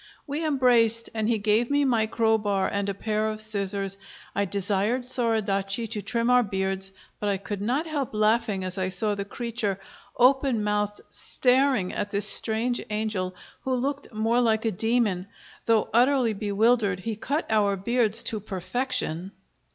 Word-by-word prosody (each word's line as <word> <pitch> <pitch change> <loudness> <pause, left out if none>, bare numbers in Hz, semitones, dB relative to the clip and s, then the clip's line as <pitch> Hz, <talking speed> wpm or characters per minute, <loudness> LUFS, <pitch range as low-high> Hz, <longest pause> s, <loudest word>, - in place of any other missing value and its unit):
We 295 +2 -4
embraced, 240 -6 +2
and 220 0 -1
he 230 - +2
gave 215 +3 +1
me 285 0 +2
my 230 -4 +1
crowbar 215 -4 +1
and 200 0 -1
a - - -1
pair 215 +1 -1
of 215 0 -4
scissors. 200 -2 0 0.3
I 200 - 0
desired 200 +5 -1
Soradaci 220 -4 +1
to 215 -2 -2
trim 235 +2 -2
our 250 0 +5
beards, 195 -2 -2 0.3
but 205 - -1
I 200 - 0
could 200 +1 -6
not 255 +9 -1
help 290 -8 -4
laughing 215 -2 +1
as 185 +1 -4
I 185 0 -1
saw 210 +2 0
the 200 -1 -4
creature, 220 -2 -3 0.4
open 255 -2 +3
mouthed, 210 0 -1
staring 255 -6 +2
at 205 - -3
this 205 0 +5
strange 230 +3 +3
angel, 210 -4 -2 0.3
who 260 -1 -1
looked 275 +3 -3
more 225 +2 +1
like 220 -1 +1
a 225 - +1
demon. 215 -3 0 0.4
Though 225 -2 +3
utterly 250 -1 +3
bewildered, 210 -1 +1
he 225 +2 -4
cut 280 +9 -2
our 205 -2 +2
beards 225 +2 +2
to 220 - 0
perfection. 195 -2 -3
220 Hz, 160 wpm, -25 LUFS, 200-240 Hz, 0.4 s, our